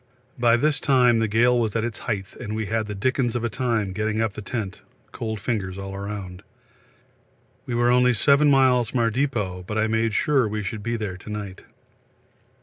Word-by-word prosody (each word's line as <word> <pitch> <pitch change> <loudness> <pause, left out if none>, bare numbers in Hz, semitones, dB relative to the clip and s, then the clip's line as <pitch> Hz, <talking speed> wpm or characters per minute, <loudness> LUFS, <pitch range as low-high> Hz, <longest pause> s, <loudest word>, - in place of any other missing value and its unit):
By 120 -1 +4
this 150 +3 +1
time 125 -4 +4
the 110 - +1
gale 120 +3 +3
was 110 -2 -1
at 115 - +1
its 115 -1 -4
height 100 -3 -4
and 110 -3 -5
we 110 0 -2
had 110 +1 -1
the 105 - -5
dickens 125 +3 0
of 120 - -1
a 115 - 0
time 110 -5 -1
getting 110 +1 -1
up 110 -2 0
the 110 - -7
tent, 105 -3 -5 0.3
cold 110 -2 -4
fingers 100 -4 -3
all 95 0 -6
round. 100 -2 -6 1.3
We 120 - -2
are 120 +1 +3
only 125 0 +4
7 140 +6 +4
miles 130 -4 +4
from 130 - -1
our 115 -1 +2
depot, 105 -8 -2
but 110 - -3
I 110 - +2
made 110 0 0
sure 135 -4 +2
we 105 0 -3
should 105 +2 -5
be 115 +2 -2
there 100 -5 -4
to 95 - -12
night. 105 -3 -6
110 Hz, 205 wpm, -24 LUFS, 105-120 Hz, 1.3 s, By